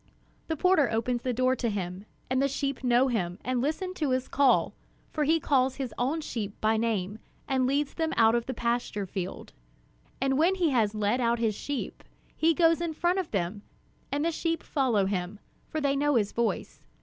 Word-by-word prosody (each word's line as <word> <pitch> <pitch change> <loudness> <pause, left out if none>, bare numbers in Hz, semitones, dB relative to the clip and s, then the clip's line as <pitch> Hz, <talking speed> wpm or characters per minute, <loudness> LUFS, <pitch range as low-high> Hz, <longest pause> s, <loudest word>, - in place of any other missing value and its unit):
The 320 - -2
porter 340 -5 +4
opens 235 +2 -1
the 255 - -1
door 255 +2 +2
to 240 -2 -1
him, 190 -1 -4 0.2
and 260 0 +1
the 275 - +3
sheep 275 -1 -3
know 245 +1 +4
him, 180 -8 -1
and 250 0 0
listen 320 +7 -2
to 305 -6 -1
his 255 0 0
call, 275 -2 +3 0.4
for 305 -1 0
he 325 +3 +3
calls 265 -3 +2
his 260 -5 -4
own 280 +7 -1
sheep 210 -8 -5
by 220 +1 +2
name 220 -2 -1 0.3
and 260 -2 +1
leads 280 +2 0
them 320 -1 -1
out 225 -1 +6
to 235 +1 +2
the 260 +2 -6
pasture 235 -4 -1
field. 185 0 -6 0.7
And 270 +1 +1
when 350 +4 +4
he 345 -5 +1
has 220 -4 +2
led 215 +4 +1
out 235 0 +2
his 225 -2 +1
sheep, 285 +6 -5 0.3
he 325 0 +3
goes 330 0 +4
in 330 -2 -2
front 350 +4 +1
of 365 - -3
them, 195 +1 -2 0.5
and 290 +3 0
the 335 - +2
sheep 330 +1 -2
follow 245 -9 +1
him, 190 +1 -2 0.3
for 315 - -2
they 280 -2 +1
know 290 0 +2
his 210 -4 +2
voice. 235 -1 -2
255 Hz, 200 wpm, -28 LUFS, 220-295 Hz, 0.7 s, out